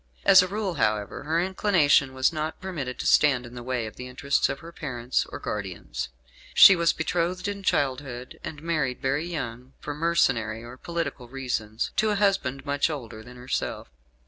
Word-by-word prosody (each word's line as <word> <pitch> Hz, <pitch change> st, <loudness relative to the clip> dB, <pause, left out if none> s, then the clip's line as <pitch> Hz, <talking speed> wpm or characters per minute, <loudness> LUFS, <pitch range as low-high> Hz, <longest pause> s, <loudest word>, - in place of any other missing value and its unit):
As 195 Hz, -1 st, +9 dB
a 185 Hz, -, -1 dB
rule, 200 Hz, -1 st, -2 dB
however, 105 Hz, +4 st, 0 dB
her 160 Hz, +2 st, +1 dB
inclination 175 Hz, -8 st, +3 dB
was 130 Hz, +5 st, +2 dB
not 155 Hz, 0 st, -3 dB
permitted 155 Hz, -10 st, -5 dB
to -, -, -5 dB
stand 135 Hz, -5 st, +4 dB
in 120 Hz, -, -11 dB
the 120 Hz, -, -7 dB
way 125 Hz, -1 st, -2 dB
of 110 Hz, -, -9 dB
the 125 Hz, -, -7 dB
interests 135 Hz, +2 st, +1 dB
of -, -, -3 dB
her 165 Hz, +3 st, -11 dB
parents 130 Hz, -6 st, -2 dB
or -, -, -7 dB
guardians. 90 Hz, -13 st, -5 dB, 0.5 s
She 190 Hz, -, +10 dB
was 170 Hz, -1 st, +3 dB
betrothed 180 Hz, +3 st, -1 dB
in 200 Hz, -1 st, -4 dB
childhood, 130 Hz, -7 st, -1 dB
and 150 Hz, -1 st, -7 dB
married 155 Hz, -7 st, -1 dB
very 140 Hz, +4 st, -1 dB
young, 125 Hz, -6 st, -5 dB
for 145 Hz, -, -5 dB
mercenary 130 Hz, -9 st, +1 dB
or 120 Hz, +1 st, -9 dB
political 145 Hz, -4 st, -4 dB
reasons, 120 Hz, -4 st, -3 dB
to 215 Hz, +2 st, +3 dB
a 210 Hz, -, +1 dB
husband 190 Hz, -10 st, +1 dB
much 145 Hz, +2 st, +1 dB
older 120 Hz, -8 st, -6 dB
than 125 Hz, +2 st, -13 dB
herself. 125 Hz, -, -3 dB
140 Hz, 180 wpm, -26 LUFS, 125-170 Hz, 0.5 s, She